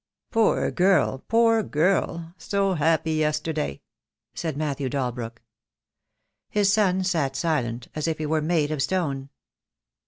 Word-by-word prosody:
"Poor 225 -2 +2
girl! 180 -8 +2
poor 225 0 +4
girl! 170 -1 0
So 200 -1 0
happy 160 0 +1
yesterday!" 155 -1 -1 0.5
said 160 -4 -4
Matthew 145 -3 -2
Dalbrook. 120 -3 -4 1.1
His 200 -1 +2
son 190 -3 +2
sat 160 -8 0
silent, 125 -7 -1
as 155 +1 -2
if 160 -1 -1
he 155 - -3
were 155 +1 +1
made 155 -1 +1
of 150 -3 -1
stone. 140 -6 -1
155 Hz, 125 wpm, -25 LUFS, 140-185 Hz, 1.1 s, poor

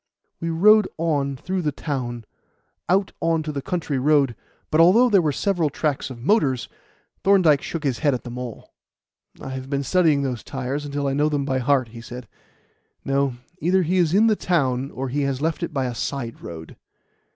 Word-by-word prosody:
We 165 - -3
rode 210 +5 +5
on 145 -4 0
through 185 +7 -3
the 150 -3 0
town 125 -6 -4 0.6
out 195 +2 +2
on 165 -1 +1
to 155 - -4
the 140 -2 -4
country 155 -4 -2
road; 140 -3 +3 0.4
but 155 - +5
although 225 +9 +6
there 195 -3 +6
were 155 -3 +1
several 175 +1 0
tracks 145 -1 -2
of 120 -2 -9
motors, 145 - +2 0.6
Thorndyke 175 -8 +5
shook 165 -2 -5
his 135 -5 -1
head 145 -4 +2
at 125 - -6
them 120 -1 -7
all. 125 -3 -8 0.7
"I - - -7
have 130 0 -6
been 140 0 -1
studying 155 -3 +3
those 125 -4 -3
tyres 135 +2 -4
until 145 0 -3
I 135 - 0
know 150 +2 +2
them 145 -2 -1
by 130 -2 0
heart," 130 -1 +1
he 115 +1 -10
said. 125 0 -9 0.8
"No; 135 -2 +1 0.2
either 185 +2 +2
he 180 +3 0
is 170 -4 +3
in 205 +5 +4
the 220 -1 +4
town, 135 -9 0
or 135 -1 -5
he 145 +3 -1
has 140 -2 -1
left 160 +3 -1
it 170 - -3
by 135 -4 -1
a 125 - -3
side 120 +1 -4
road." 80 -2 -9
145 Hz, 195 wpm, -23 LUFS, 130-165 Hz, 0.8 s, although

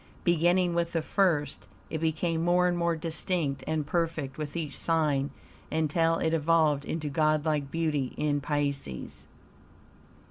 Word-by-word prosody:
Beginning 175 +1 +3
with 170 0 0
the 165 -2 0
first, 160 - 0 0.2
it 160 - -2
became 165 +1 0
more 180 +1 +3
and 175 - +1
more 170 -1 +1
distinct 160 -3 -1
and 155 -2 -1
perfect 160 -4 -1
with 150 +1 -5
each 155 -3 -4
sign 150 -4 +1 0.4
until 160 +1 +2
it 160 0 0
evolved 155 -2 +2
into 155 -2 -3
godlike 155 -1 +1
beauty 150 -4 -1
in 145 -1 0
Pisces. 140 - -3
160 Hz, 135 wpm, -28 LUFS, 145-165 Hz, 0.4 s, Beginning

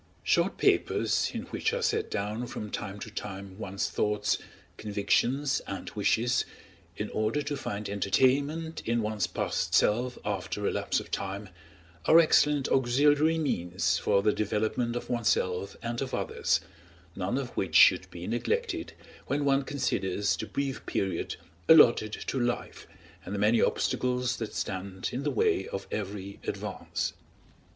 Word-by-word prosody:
Short - - +2
papers, - - +2
in - - -4
which - - -2
are - - -1
set - - 0
down 105 +4 -3
from 105 -2 -6
time 100 -1 -4
to 110 - -7
time 100 -2 -7
one's 100 -2 -2
thoughts, 105 0 0 0.4
convictions, 120 +7 +1
and 95 - -5
wishes, 115 +4 +2 0.5
in - - -4
order 110 +7 0
to 145 - -3
find 105 -6 -4
entertainment 140 - +1
in 115 0 0
one's 105 -4 -1
past 90 - -1
self 120 +4 +2
after 100 0 -3
a - - +2
lapse - - 0
of - - -10
time, 100 +1 -4 0.6
are 160 - +7
excellent 150 -3 +4
auxiliary 145 +5 +3
means 90 - 0
for 100 - +2
the 105 0 +3
development 110 +3 -1
of 120 - -4
oneself 100 -5 0
and 120 0 -3
of 130 -1 -2
others, 450 0 0 0.5
none - - -1
of - - -3
which - - -3
should - - +7
be - - -8
neglected 470 +1 -2 0.3
when 145 +1 0
one 140 0 +3
considers 105 -8 0
the 110 - -5
brief 135 +6 -3
period 95 -4 -1 0.3
allotted 120 -9 +7
to 130 - -3
life 120 0 -2 0.4
and 100 - -5
the - - -2
many 105 +3 +3
obstacles 125 0 0
that 110 -2 -5
stand 95 0 -3
in 125 - -2
the 145 - 0
way 430 -4 +1
of 100 - -5
every 100 -1 -5
advance. - - -3
110 Hz, 150 wpm, -29 LUFS, 100-135 Hz, 0.6 s, are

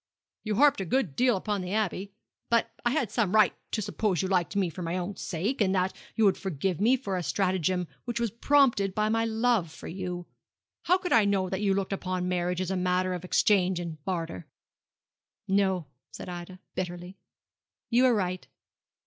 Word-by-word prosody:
'You 215 -1 -1
harped 285 -3 +4
a - - -2
good 185 - 0
deal 245 -4 +3
upon 205 0 -2
the 180 +1 -4
Abbey. 200 -2 -1 0.4
But 235 -1 +2
I 240 - +3
had 255 -5 0
some 220 -3 +1
right 215 -3 +5 0.2
to 215 - -2
suppose 190 -4 0
you - - 0
liked 185 0 0
me 195 -2 +2
for 170 +2 -7
my 170 +1 -2
own 185 +2 -3
sake, 210 - -2
and 195 -1 +3
that 185 +1 +1 0.2
you 220 - +3
would 195 - +3
forgive 185 0 -2
me 245 +5 +4
for 200 -7 -3
a - - -1
stratagem 185 -1 0 0.2
which 240 -1 -2
was 235 -3 0
prompted 235 -6 +3
by 215 0 +1
my 225 +1 +1
love 225 -6 +1
for - - -10
you. 180 -1 -5 0.6
How 365 - +4
could 365 -1 -2
I 220 -3 +6
know 195 -2 +1
that 190 +1 -2
you 195 -2 +2
looked 195 0 -1
upon 185 -1 -2
marriage 180 0 -1
as 185 0 -2
a - - 0
matter 180 0 +1
of 180 -1 -5
exchange 185 -1 +2
and 160 -4 -6
barter?' 165 - -4 1.0
'No,' 190 -3 +2 0.3
said - - -8
Ida, 180 +1 -7 0.2
bitterly. 180 +1 -5 0.7
'You 250 +2 +5
are 245 - +4
right. 185 -3 -2
190 Hz, 195 wpm, -28 LUFS, 180-215 Hz, 1.0 s, I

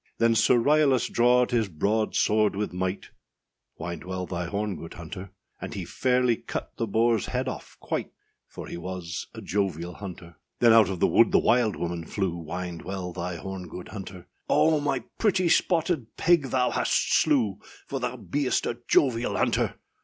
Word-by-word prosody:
Then 115 0 +4
Sir 115 +2 +4
Ryalas 140 -1 +3
drawed 125 +1 +4
his 115 -4 +1
broad 105 +7 0
sword 105 -1 +2
with 105 -2 -3
might, 95 +1 -3 0.7
Wind 85 -1 -5
well 90 0 -4
thy 90 -1 -4
horn, 100 +1 -2
good 85 - -9
hunter; 90 +3 -8 0.3
And - - -6
he - - -4
fairly 125 -2 +1
cut - - -6
the 115 - -1
boarâs 115 +1 +2
head - - -2
off - - -7
quite, - - -3 0.4
For - - -9
he - - -7
was 85 -1 -5
a - - -8
jovial 90 -3 -2
hunter. 85 -4 -9 0.2
Then 120 -2 +6
out 110 -4 +6
of 95 -3 -4
the - - +5
wood 115 - +4
the - - +5
wild 115 -3 +3
woman 85 +1 -3
flew, 95 -4 -1
Wind 85 +1 -5
well 95 -1 -5
thy 90 0 -4
horn, 95 +1 -6
good 90 +2 -9
hunter; 95 -3 -8 0.2
âOh, 155 -2 +4
my 135 -4 -1 0.2
pretty 195 -5 +2
spotted 165 -7 +1
pig 170 -5 +3
thou 125 -1 +1
hast - - +1
slew, 120 -10 +1 0.3
For 135 - -4
thou 125 0 -2
beest 135 +2 -1
a 120 - -3
jovial 120 -3 +2
hunter. - - +1
105 Hz, 175 wpm, -26 LUFS, 90-125 Hz, 0.7 s, Then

